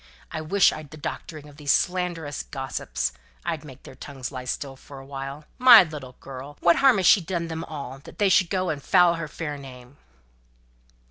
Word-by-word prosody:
I 160 - -4
wish 185 +5 +4
I'd 155 -2 -9
the 155 - -11
doctoring 150 0 -7
of 145 -1 -15
these 145 -2 0
slanderous 175 -5 -1
gossips. 130 - -4 0.3
I'd 165 -3 -2
make 135 -3 -13
their - - -11
tongues 135 -2 -7
lie 130 -2 -7
still 135 +2 -4
for 140 +1 -13
a 135 - -10
while. 135 +2 -7
My 245 -5 +10
little 145 -6 -8
girl! 135 +2 -9
What 170 -1 +4
harm 270 -5 +5
has 190 - 0
she 200 - +7
done 170 0 -3
them 160 0 -4
all, 140 -3 -7
that - - -12
they 205 - +3
should 185 -2 +4
go 185 -3 0
and 145 -2 -5
foul 180 +2 +5
her 165 -2 -4
fair 150 -1 -5
name?" 130 0 -12
150 Hz, 200 wpm, -25 LUFS, 135-170 Hz, 0.3 s, My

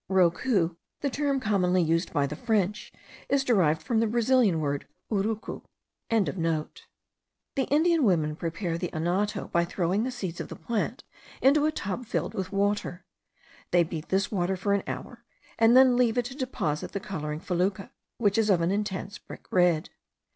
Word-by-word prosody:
Rocou, 180 -1 +2 0.2
the 280 - -1
term 280 0 0
commonly 185 -6 +2
used 165 +2 0
by 145 -3 +1
the 145 +2 -4
French, 210 0 -1 0.4
is 280 -1 +2
derived 175 - +2
from 230 -2 +1
the 225 - +2
Brazilian 235 -5 +3
word, 145 -2 -2 0.2
urucu.) 215 +1 -2 0.5
The 185 - -3
Indian 320 +2 +3
women 160 -8 +2
prepare 170 +1 -3
the 180 - -2
anato 180 +6 -1
by 170 - +3
throwing 180 +4 0
the 255 - -1
seeds 190 -10 -5
of - - -6
the - - -7
plant 230 -3 -3 0.4
into 290 +3 +4
a - - +1
tub 215 -2 -4
filled - - -2
with 190 0 -4
water. 200 -2 -1 0.6
They 175 -1 +4
beat 160 -1 -6
this 195 +1 +1
water 190 -2 0
for 200 +2 0
an 200 - +2
hour, - - -6 0.4
and 230 +2 +6
then 260 -1 +7
leave 245 -1 +2
it 245 - +1
to 255 +2 -6
deposit 250 - -3
the 200 - -2
colouring 150 -6 -4
fecula, 190 +5 -1 0.3
which 210 -1 +2
is 215 -1 +2
of 180 -4 +4
an 170 +2 +1
intense 200 -1 -3
brick - - -12
red. 175 -2 +2
195 Hz, 170 wpm, -27 LUFS, 170-230 Hz, 0.6 s, then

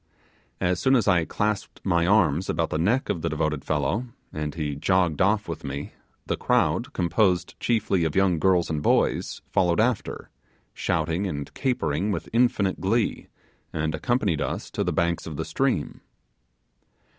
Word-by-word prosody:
As 90 0 +1
soon 135 0 +3
as 115 -5 +2
I 90 -4 +4
clasped 105 +2 -2
my 85 -3 +2
arms 90 -4 +3
about - - 0
the 75 - -1
neck 115 +11 +1
of 85 - -2
the 85 - -1
devoted 75 -2 -1
fellow, 80 - -1 0.3
and 75 -1 -4
he 75 -3 -2
jogged 90 +1 +1
off 105 +2 +2
with 85 -1 -5
me, 70 0 -5 0.3
the - - -1
crowd - - +1
composed 90 +1 +1
chiefly 110 -6 +1
of 80 -2 -1
young 95 -4 +3
girls 90 0 +3
and 75 -2 -1
boys - - +1
followed 90 0 +2
after, 115 0 -1 0.4
shouting 85 +4 -1
and 75 -5 -5
capering 105 - -1
with - - -4
infinite 115 -5 +2
glee, 110 +4 0 0.4
and 80 0 -2
accompanied 100 - 0
us - - -3
to - - -1
the - - 0
banks 85 0 0
of 80 -3 -6
the - - -2
stream. - - -1
90 Hz, 160 wpm, -25 LUFS, 80-100 Hz, 0.4 s, I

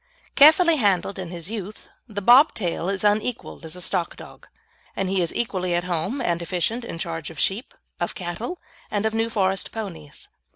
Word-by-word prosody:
Carefully 320 +3 +7
handled 200 -4 +1
in 180 -2 -5
his 175 +2 -6
youth, 210 -1 -6 0.2
the 205 -3 -5
bob 255 +8 +7
tail 175 -3 -2
is 195 0 -1
unequalled 210 0 0
as 160 - -5
a 180 - -7
stock 180 -2 -1
dog, - - -13 0.5
and 195 - -1
he 190 -1 +1
is 170 - 0
equally 185 -6 -1
at 175 - +1
home 180 - -2
and 175 -8 0
efficient 185 +8 -1
in 200 - -6
charge 165 -2 -4
of 165 - -12
sheep, 240 - -1 0.2
of - - -2
cattle, 185 - -5 0.3
and 205 0 -1
of 220 - +1
New 225 +1 0
Forest 195 -4 0
ponies. 170 -10 -7
195 Hz, 190 wpm, -24 LUFS, 175-225 Hz, 0.5 s, Carefully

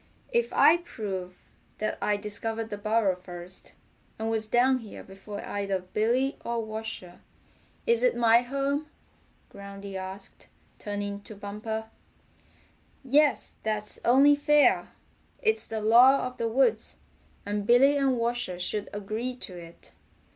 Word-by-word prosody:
"If 475 0 +1
I 330 - +6
prove 195 - -6 0.4
that 215 - -3
I 205 0 +1
discovered 220 +2 -3
the 205 - -3
burrow 215 -2 +1
first, 180 0 -11 0.4
and 225 +1 -2
was 220 -1 -1
down 255 +3 +3
here 220 -4 -10
before 195 +2 -9
either 200 -1 -2
Billy 225 +9 -1
or 235 -1 -2
Washer, 215 -5 -7 0.6
is 470 -1 +3
it - - +2
my 230 -1 +5
home?" 275 +4 -2 0.6
Groundy 200 0 -9
asked, 190 +1 -9 0.3
turning 205 -1 -4
to 215 - -11
Bumper. 220 +2 -6 1.1
"Yes, 285 +3 +2
that's 210 -1 -1
only 275 +4 +6
fair. 295 0 +3 0.5
It's 440 -1 +3
the 220 -1 -4
law 245 +6 +6
of 250 0 -6
the 230 - -1
woods, 230 -2 +1 0.5
and 205 0 -3
Billy 270 +4 +6
and 270 -3 +2
Washer 235 -6 -2
should 200 +3 -2
agree 215 +5 -4
to 195 -7 -8
it. 170 -1 -13
220 Hz, 135 wpm, -27 LUFS, 200-255 Hz, 1.1 s, I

